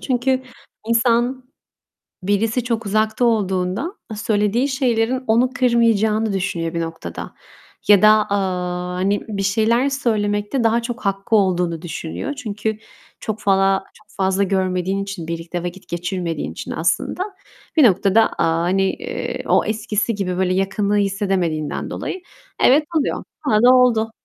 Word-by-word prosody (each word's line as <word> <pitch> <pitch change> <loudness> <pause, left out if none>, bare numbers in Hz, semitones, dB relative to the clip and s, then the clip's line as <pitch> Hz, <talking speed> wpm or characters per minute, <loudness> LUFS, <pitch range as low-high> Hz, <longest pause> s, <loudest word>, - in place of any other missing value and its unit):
Çünkü 260 0 0 0.5
insan 240 +2 +2 0.8
birisi 220 +5 +1
çok 230 -2 -2
uzakta 215 +3 +1
olduğunda 195 - 0 0.2
söylediği 215 +4 +1
şeylerin 255 -1 0
onu 235 +3 +3
kırmayacağını 225 -3 +2
düşünüyor 175 -4 -2
bir 170 - -1
noktada. 165 0 -6 0.5
Ya 205 -2 +7
da, 215 - +7 0.2
aaa, 180 -2 -2
hani, 195 +3 0
bir 200 -2 -3
şeyler 225 +6 +2
söylemekte 215 -2 0
daha 230 +1 +3
çok 240 +1 -5
hakkı 195 +3 0
olduğunu 180 -4 +1
düşünüyor. 170 - -5
Çünkü 220 -4 -3 0.4
çok 215 0 -4
fala 195 -1 +2
çok 215 - -22
fazla 190 0 +1
görmediğin 190 0 0
için, 195 -5 -6
birlikte 170 +1 -4
vakit 180 +2 -7
geçirmediğin 175 -2 -3
için - - -7
aslında 365 - -1 0.5
bir 300 - +7
noktada, 200 0 +4 0.2
aaa, 165 0 +1
hani, 190 +3 +1
eee, 455 +1 -5
o - - +3
eskisi 215 0 -1
gibi 185 -3 -2
böyle 185 -1 +1
yakınlığı 200 +2 0
hissedemediğinden 190 -6 -1
dolayı 375 - -5 0.4
evet, 290 +4 +6 0.2
oluyor. - - -2 0.2
Bana 215 -1 +3
da 255 +1 +7
oldu. 225 -3 +3
205 Hz, 135 wpm, -20 LUFS, 185-230 Hz, 0.8 s, Ya